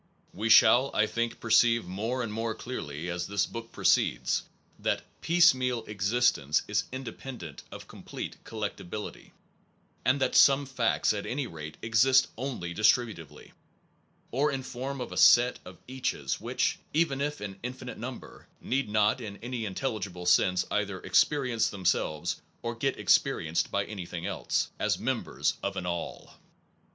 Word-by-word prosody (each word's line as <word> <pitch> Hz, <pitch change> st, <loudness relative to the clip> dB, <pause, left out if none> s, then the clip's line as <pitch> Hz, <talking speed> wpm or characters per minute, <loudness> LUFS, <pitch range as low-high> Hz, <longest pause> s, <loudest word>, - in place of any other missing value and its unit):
We 110 Hz, +4 st, -2 dB
shall, 125 Hz, +4 st, +7 dB
I 110 Hz, -, +4 dB
think, 115 Hz, +1 st, -2 dB
perceive 115 Hz, -1 st, +4 dB
more 110 Hz, +8 st, -2 dB
and 105 Hz, -2 st, -4 dB
more 115 Hz, 0 st, -2 dB
clearly 80 Hz, -, -6 dB
as 90 Hz, 0 st, -3 dB
this 100 Hz, 0 st, +1 dB
book 115 Hz, 0 st, -8 dB
proceeds, -, -, +2 dB, 0.4 s
that -, -, -1 dB, 0.2 s
piecemeal 130 Hz, -9 st, +3 dB
existence 100 Hz, -, +1 dB
is -, -, 0 dB
independent 125 Hz, -, -7 dB
of -, -, -10 dB
complete -, -, -7 dB
collectibility, 105 Hz, -2 st, -6 dB, 0.7 s
and 130 Hz, +2 st, +2 dB
that 135 Hz, -, +1 dB
some 140 Hz, 0 st, +6 dB
facts, 125 Hz, -5 st, +1 dB
at 100 Hz, -1 st, -4 dB
any 135 Hz, +2 st, -2 dB
rate, 75 Hz, -7 st, -8 dB
exist 130 Hz, +4 st, +4 dB
only 115 Hz, -9 st, -4 dB
distributively, 105 Hz, -, 0 dB, 0.8 s
or 145 Hz, +4 st, +1 dB
in 135 Hz, -1 st, -3 dB
form 130 Hz, +2 st, -5 dB
of 125 Hz, -, -5 dB
a -, -, -6 dB
set 120 Hz, +1 st, +6 dB
of 90 Hz, -1 st, -11 dB
caches 125 Hz, -, -3 dB
which -, -, 0 dB, 0.2 s
(even 155 Hz, -4 st, +2 dB
if 145 Hz, +1 st, -2 dB
in 100 Hz, -2 st, -7 dB
infinite 125 Hz, +1 st, -7 dB
number) 125 Hz, +1 st, -8 dB
need 135 Hz, -2 st, -1 dB
not 105 Hz, +3 st, +2 dB
in 100 Hz, -3 st, -7 dB
any 120 Hz, -2 st, -3 dB
intelligible 100 Hz, -4 st, -4 dB
sense 90 Hz, +1 st, +3 dB
either -, -, -1 dB
experience 130 Hz, -6 st, +2 dB
themselves, 85 Hz, -3 st, -1 dB, 0.2 s
or 115 Hz, 0 st, -2 dB
get 135 Hz, +3 st, -1 dB
experi 80 Hz, -, +2 dB
enced 80 Hz, +2 st, 0 dB
by 100 Hz, 0 st, 0 dB
anything 90 Hz, -5 st, -6 dB
else, -, -, -1 dB
as -, -, +1 dB
members -, -, -1 dB
of 100 Hz, 0 st, -3 dB
an 95 Hz, -, -3 dB
All. 85 Hz, -1 st, -5 dB
115 Hz, 145 wpm, -29 LUFS, 95-130 Hz, 0.8 s, shall